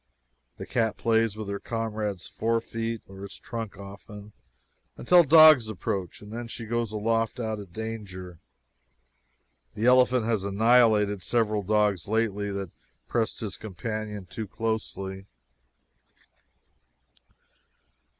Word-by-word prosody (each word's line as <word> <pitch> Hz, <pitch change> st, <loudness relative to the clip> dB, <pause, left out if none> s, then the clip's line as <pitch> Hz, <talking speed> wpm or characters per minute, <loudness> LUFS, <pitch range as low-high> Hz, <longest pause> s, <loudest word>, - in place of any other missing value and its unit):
The -, -, -7 dB
cat 115 Hz, -3 st, 0 dB
plays 115 Hz, -2 st, +2 dB
about 110 Hz, -1 st, -6 dB
her 100 Hz, 0 st, -3 dB
comrade's 110 Hz, -4 st, -3 dB
forefeet 115 Hz, 0 st, -2 dB
or 95 Hz, 0 st, -12 dB
his 100 Hz, -1 st, -8 dB
trunk 115 Hz, -5 st, -6 dB
often, 100 Hz, +1 st, -11 dB, 0.6 s
until 175 Hz, +7 st, +6 dB
dogs 155 Hz, -6 st, +8 dB
approach, 95 Hz, -3 st, -4 dB
and 105 Hz, +1 st, -10 dB
then 120 Hz, 0 st, -5 dB
she 115 Hz, 0 st, -7 dB
goes 120 Hz, -1 st, -2 dB
aloft 115 Hz, +3 st, 0 dB
out 110 Hz, -2 st, -2 dB
of 100 Hz, -4 st, -10 dB
danger. 95 Hz, -5 st, -7 dB, 1.4 s
The 110 Hz, +2 st, -1 dB
elephant 125 Hz, -1 st, +5 dB
has 110 Hz, -4 st, 0 dB
annihilated 105 Hz, -1 st, +3 dB
several 110 Hz, +2 st, +1 dB
dogs 105 Hz, -3 st, +1 dB
lately 105 Hz, -2 st, 0 dB
that 100 Hz, -2 st, -5 dB, 0.4 s
pressed 115 Hz, -2 st, -1 dB
his 105 Hz, -3 st, -4 dB
companion 105 Hz, 0 st, -5 dB
too 110 Hz, +4 st, -6 dB
closely. 100 Hz, -3 st, -4 dB
110 Hz, 115 wpm, -27 LUFS, 100-115 Hz, 1.4 s, dogs